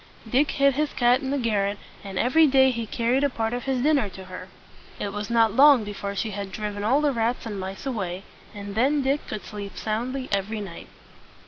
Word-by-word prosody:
Dick 265 +6 +2
hid 275 -1 +3
his 300 +2 -1
cat 245 +1 +3
in 265 - -4
the 285 - 0
garret, 205 -5 0 0.3
and 195 -2 -7
every 310 +9 +4
day 265 -1 +5
he 230 -2 -4
carried 240 +5 +1
a 285 - +3
part 225 -2 -2
of 245 - -4
his 260 -2 0
dinner 285 -8 +2
to 190 0 -10
her. 185 0 -9 0.5
It 200 - -3
was 210 0 -4
not 225 -2 +3
long 275 -3 +7
before 200 -1 -5
she 215 +2 -2
had 200 -1 -5
driven 205 0 -4
all 260 +7 +3
the 295 -1 +2
rats 235 +1 -1
and 210 -3 -5
mice 190 +5 -6
away; 195 -8 -3 0.3
and 200 -1 -7
then 275 +6 +2
Dick 275 +2 0
could 215 - -6
sleep 200 -3 -8
soundly 250 +5 -3
every 200 +2 -1
night. 190 -5 -8
225 Hz, 215 wpm, -25 LUFS, 200-265 Hz, 0.5 s, long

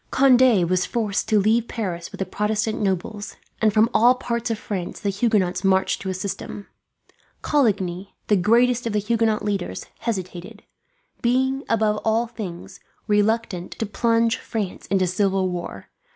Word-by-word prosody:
Conde 255 -8 +5
was 185 +1 +1
forced 215 -4 -1
to 215 - +4
leave 220 +3 +2
Paris 180 -7 -4
with - - -9
the 190 - -2
Protestant 210 +3 -1
nobles, 205 +2 -2 0.3
and 215 -1 +4
from 215 +2 +4
all 245 +3 +5
parts 235 -2 -3
of 225 - -1
France 190 -5 -5
the 200 -3 -1
Huguenots 195 -3 +1
marched 190 0 +2
to 190 - -4
assist 185 +1 -3
him. 200 - -8 0.8
Coligny, 195 -9 0
the 210 - +3
greatest 235 +5 +3
of 225 - -2
the - - +1
Huguenot 220 0 0
leaders, 195 - -3
hesitated; 185 -6 -5 0.6
being, 265 +2 +1
above 215 -2 +2
all 225 +2 +2
things, 205 -7 -8 0.3
reluctant 210 -3 0
to 225 - -3
plunge 230 +2 +1
France 210 -5 -5
into 190 -1 +2
civil 190 0 +1
war. 175 - -6
210 Hz, 150 wpm, -23 LUFS, 190-230 Hz, 0.8 s, Conde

